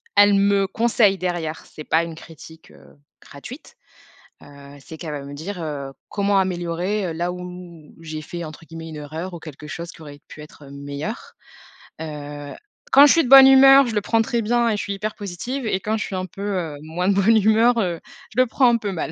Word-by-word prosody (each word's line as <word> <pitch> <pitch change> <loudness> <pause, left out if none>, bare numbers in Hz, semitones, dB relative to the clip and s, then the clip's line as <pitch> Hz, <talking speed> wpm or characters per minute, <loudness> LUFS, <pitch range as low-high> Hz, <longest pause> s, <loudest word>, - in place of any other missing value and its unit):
elle 205 0 +6
me 200 0 +3
conseille 220 -2 +2
derrière. 175 -4 -4
C'est 155 - -11
pas 160 +2 +1
une 165 -1 -7
critique, 160 0 -14
heu, - - -19 0.3
gratuite, 255 - -12 0.7
heu, 140 0 -14
c'est 160 +3 -11
qu'elle 155 -2 -7
va 145 -1 -6
me 140 +1 -9
dire, 175 +5 -6
heu, 140 -3 -5 0.2
comment 200 -1 +1
améliorer, 180 +2 -2
heu, 165 - -4
là 175 +2 -2
où 180 - -8 0.6
où 165 - -17
j'ai 155 -1 -6
fait 170 +3 -7
entre 155 +1 -10
guillemets 165 0 -9
«une 155 - -9
erreur» 160 +5 -7
ou 170 - -7
quelque 150 -1 -11
chose 170 +3 -7
qui - - -16
aurait 145 -2 -11
pu 150 - -12
être, 150 -1 -14
heu, 140 - -13
meilleur, 145 - -7 0.7
heu. 145 -2 -7 0.4
Quand 280 -6 +8
je - - +5
suis 330 - +3
de 245 - -4
bonne 270 0 +10
humeur, 270 0 +8
je 230 - -4
le 210 - +1
prends 225 +2 +1
très 235 0 -1
bien 235 +2 +1
et 215 - 0
je - - -3
suis 200 - -4
hyper 210 +2 -4
positive 220 +7 -5
et 190 - 0
quand 215 +3 -2
je - - -3
suis 195 - -6
un 185 0 -3
peu, 185 +2 -11 0.2
heu, 160 -4 -4
moins 165 +4 -3
de - - +4
bonne 220 +3 +4
humeur, 220 +3 +3
heu, 175 -5 -1 0.4
je 255 - +4
le 255 - +2
prends 255 +2 +3
un 235 - +3
peu 210 -3 -4
mal. 165 -3 -4
180 Hz, 230 wpm, -21 LUFS, 155-215 Hz, 0.7 s, bonne